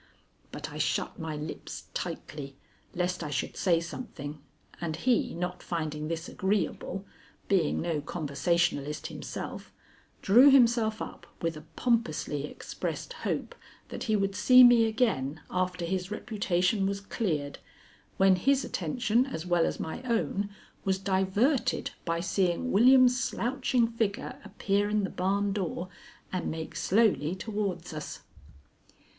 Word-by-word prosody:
But - - -6
I - - -7
shut - - -1
my 160 -1 -4
lips 150 +1 -6
tightly 140 -2 -5 0.4
lest 180 0 -1
I 150 - -4
should 140 -1 -2
say 175 -4 +3
something, 155 - -7 0.4
and 160 -2 -2
he, 240 +8 +1
not 180 +1 -3
finding 155 -3 -3
this 165 +1 -3
agreeable, 195 -1 -1 0.4
being 185 -7 +2
no 165 -3 -1
conversationalist 150 0 -1
himself, - - -6 0.5
drew 245 +8 +8
himself 235 -4 +4
up - - -10 0.2
with 165 -1 0
a 155 - -8
pompously 155 - 0
expressed - - -5 0.2
hope - - -2 0.4
that - - -5
he 220 - +2
would 195 -1 +1
see 250 +5 +7
me 240 -2 +7
again 215 - 0
after 180 -1 -1
his 185 +1 -2
reputation 200 -2 0
was 200 0 -2
cleared, 165 -8 -2 0.6
when 190 -1 +5
his 275 +7 +2
attention 240 0 0
as 175 -11 -5
well 175 -2 +3
as - - -3
my 160 - -4
own 225 -5 -1 0.3
was 190 -1 +1
diverted 195 +8 +1
by 165 0 0
seeing 185 +7 0
William's 250 +3 +6
slouching 250 -1 +1
figure 225 -3 -2
appear 205 0 0
in 210 -1 +1
the 190 - -2
barn 195 +2 0
door 185 -2 -3 0.4
and 185 - -1
make 160 0 -5
slowly 190 -6 +2
towards 195 -5 -3
us. 150 -1 -6
190 Hz, 135 wpm, -29 LUFS, 165-220 Hz, 0.6 s, drew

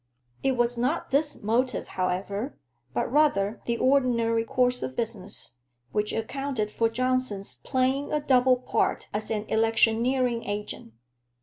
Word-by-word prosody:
It 270 - +2
was 240 -1 +1
not 260 +8 -1
this 290 -1 0
motive, 245 +5 0
however, 200 +7 -2 0.3
but 185 - -1
rather 240 -8 +2
the 235 0 +1
ordinary 235 -4 +2
course 250 +2 +1
of 260 - -4
business, 210 - -4 0.3
which 210 0 0
accounted 225 -1 -2
for 230 +1 +1
Johnson's 255 -4 -1
playing 265 +2 0
a 300 - +2
double 255 -3 +4
part 250 - -1
as 210 +1 -3
an 215 -1 -2
electioneering 230 +2 +2
agent. 205 - -5
235 Hz, 130 wpm, -27 LUFS, 215-255 Hz, 0.3 s, double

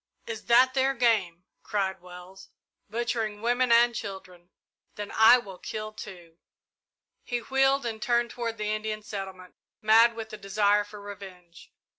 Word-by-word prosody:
"Is 465 -1 -7
that 250 +2 +5
their 270 0 +1
game?" 205 -8 +1 0.2
cried 190 -3 -2
Wells; 180 +1 -13 0.4
"butchering 225 -2 -2
women 245 +2 +1
and 235 +1 +5
children! 185 -4 -8 0.5
Then 205 -1 -6
I 220 +3 +7
will 195 -6 -9
kill, 215 0 -6
too!" 175 -6 -11 0.8
He 245 - -3
wheeled 270 +2 +1
and 220 -2 -4
turned 240 0 +1
toward 230 -2 -4
the 210 0 -2
Indian 215 0 -4
settlement, 190 -3 -8 0.3
mad 225 +2 +5
with 225 -1 -7
the 215 - -8
desire 205 +1 +2
for 205 0 -12
revenge. 190 -4 -12
215 Hz, 145 wpm, -27 LUFS, 195-235 Hz, 0.8 s, I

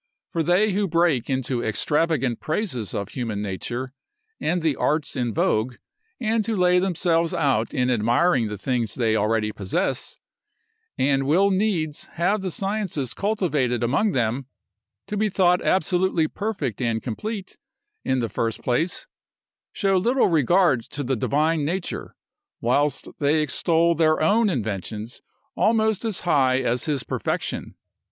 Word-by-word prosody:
For 165 - 0
they 180 +6 +3
who 200 +1 0
break 165 -8 +1
into 130 -2 -1
extravagant 140 +1 +1
praises 155 - -2
of 100 0 -3
human 115 -4 -3
nature, 120 +6 -4 0.5
and 170 +1 0
the 155 -4 +2
arts 155 0 0
in 120 -2 -1
vogue, 110 +3 0 0.4
and 225 -1 +1
who 225 +1 -1
lay 180 -1 +4
themselves 175 -2 +1
out 135 -9 +1
in 125 0 +1
admiring 120 +3 +2
the 105 0 -5
things 120 0 -1
they 115 -3 +1
already 105 0 +1
possess, 100 -3 -2 0.8
and 135 0 +2
will 190 +7 +4
needs 185 -7 0
have 195 +5 +1
the 190 - -2
sciences 195 - -2
cultivated 150 - 0
among 140 - +1
them, 120 +2 -1 0.6
to 210 - -4
be 215 +1 +1
thought 180 -2 +3
absolutely 180 -2 +1
perfect 175 - -3
and 115 -2 -1
complete, 195 - -5 0.4
in 130 -1 0
the 115 - 0
first 115 +2 -3
place, 160 +9 0 0.7
show 195 -2 +1
little 240 +7 +2
regard 160 -3 +3
to 145 - -5
the 135 +1 0
divine 150 +6 +1
nature, 175 +5 -3 0.4
whilst 140 +5 +1
they 150 +2 +3
extol 165 +3 +2
their 155 -1 +2
own 210 +8 +3
inventions 110 - -4 0.3
almost 220 -1 +2
as 220 -5 -2
high 135 -7 +3
as 125 -1 0
his 145 -5 -1
perfection. - - -3
150 Hz, 140 wpm, -24 LUFS, 120-185 Hz, 0.8 s, lay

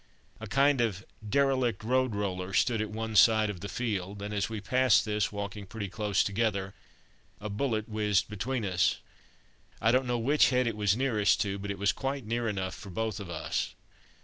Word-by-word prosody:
A - - -7
kind 140 -1 +3
of 100 -5 -1 0.2
derelict 130 -4 +1
road 130 -1 +1
roller 95 -2 -3
stood 115 +1 +2
at 110 - -3
one 110 +1 -4
side 110 0 +5
of 95 - -9
the 100 - -6
field, 100 -5 -3
and 105 +1 -4
as 100 0 -1
we 110 -1 -4
passed 125 +3 +3
this, 105 -1 0
walking 100 -1 -5
pretty 100 -1 -5
close 105 0 +1
together, 100 -2 -1 0.7
a 105 +1 -5
bullet 110 -1 -1
whizzed 105 -5 +1
between 110 +3 -3
us. 90 -2 +2 0.8
I 115 - +3
don't 130 +1 +2
know 120 0 0
which 140 +6 +4
head 125 -1 +2
it 115 -2 -1
was 105 0 +1
nearest 115 -6 +2
to, 100 -1 -2
but 100 +1 -6
it 100 - -3
was 100 0 +2
quite 135 -2 -4
near 115 +1 -1
enough 95 -2 -3
for 100 - -10
both 110 +2 -3
of 100 -3 -7
us. 85 -3 -3
105 Hz, 195 wpm, -29 LUFS, 100-120 Hz, 0.8 s, side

